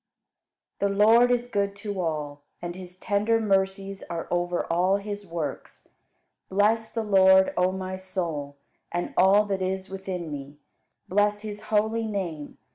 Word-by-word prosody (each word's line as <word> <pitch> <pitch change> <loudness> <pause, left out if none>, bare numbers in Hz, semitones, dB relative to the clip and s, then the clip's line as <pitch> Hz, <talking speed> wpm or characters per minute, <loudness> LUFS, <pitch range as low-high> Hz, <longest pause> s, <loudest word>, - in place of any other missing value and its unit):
61. 200 0 0
The 210 - +6
Lord 235 +3 +6
is 245 0 +1
good 200 -2 0
to 200 -2 -4
all, 150 -3 -3 0.2
and 175 0 -5
His 180 -1 -10
tender 210 +3 +1
mercies 195 -1 0
are 170 -1 -4
over 175 0 0
all 180 +3 +2
His 205 0 -6
works. 165 -3 -6 0.6
Bless 215 +3 +2
the 225 - -2
Lord, 190 -2 +5
O 180 +1 +2
my 185 0 -4
soul, 170 -7 -4 0.4
and 175 0 -3
all 195 +3 +5
that 195 -2 -2
is 190 +1 -3
within 185 -4 -5
me, 140 0 -7 0.5
bless 205 +2 +2
His 210 -1 -6
holy 220 +1 +1
name. 175 -8 -4
190 Hz, 150 wpm, -26 LUFS, 175-205 Hz, 0.6 s, The